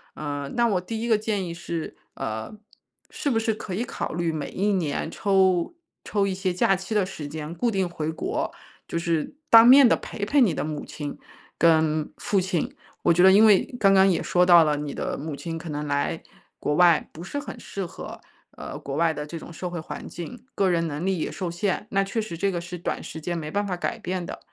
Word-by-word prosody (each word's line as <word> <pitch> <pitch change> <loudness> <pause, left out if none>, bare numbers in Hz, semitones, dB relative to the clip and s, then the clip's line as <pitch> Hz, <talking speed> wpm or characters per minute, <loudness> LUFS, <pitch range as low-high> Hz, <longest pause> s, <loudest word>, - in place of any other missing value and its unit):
呃， 145 -2 -4
那 235 -1 +3
我 190 -4 +1
第 225 +4 -5
1 235 - -2
个 220 -2 +4
建 210 -3 -2
议 170 - -5
是， 170 -1 -5 0.2
呃， 110 - -4 0.6
是 290 - -2
不 225 -3 +2
是 225 0 0
可 190 -3 -7
以 220 +6 -1
考 - - -4
虑 170 0 0
每 150 - -4
1 200 +2 0
年 160 -3 -1
抽 190 - +2 0.3
抽 200 -2 0
一 190 - -1
些 185 -1 -1
假 195 +2 +3
期 190 +4 -5
的 205 -3 +2
时 175 -6 -7
间 155 +2 -6
固 240 +4 +1
定 190 -3 0
回 160 -2 -3
国， 160 - -2 0.4
就 170 - -2
是 165 -2 -1 0.2
当 225 0 +9
面 265 0 +9
地 - - +4
陪 205 - -7
陪 285 +7 +2
你 220 -11 +4
的 - - -2
母 150 -1 -4
亲 145 -2 -6 0.4
跟 155 -2 +3
父 200 - +1
亲。 180 -2 -1 0.3
我 - - +3
觉 175 - +3
得 190 - +9
因 205 +3 +7
为 205 -3 +6
刚 195 -3 +4
刚 190 0 +6
也 180 - +1
说 180 0 +3
到 175 -2 +8
了， 150 -1 +1
你 145 -1 -4
的 - - -3
母 150 0 -5
亲 165 +2 -5
可 165 - -8
能 150 0 -3
来 145 +3 -1 0.4
国 150 - 0
外 175 -2 +4
不 165 - -11
是 195 +10 -5
很 285 - -6
适 195 -2 -5
合， - - -9 0.3
呃， - - -8
国 135 0 -5
外 165 0 +2
的 150 - -5
这 165 - -6
种 165 - -10
社 175 +2 -5
会 175 -2 -5
环 - - -7
境， 240 +9 -8
个 195 -2 +2
人 170 -1 +1
能 150 +4 -4
力 190 -3 0
也 - - -2
受 180 -3 -4
限， 185 +2 -2
那 195 0 +2
确 220 +3 -2
实 170 -6 -6
这 200 +3 +1
个 175 -2 -2
是 175 +1 -7
短 170 - -3
时 160 - -7
间 175 +2 -3
没 155 -1 -5
办 205 0 -1
法 185 - -1
改 175 - -3
变 180 0 -3
的。 - - -7
175 Hz, 250 characters per minute, -25 LUFS, 160-195 Hz, 0.6 s, 当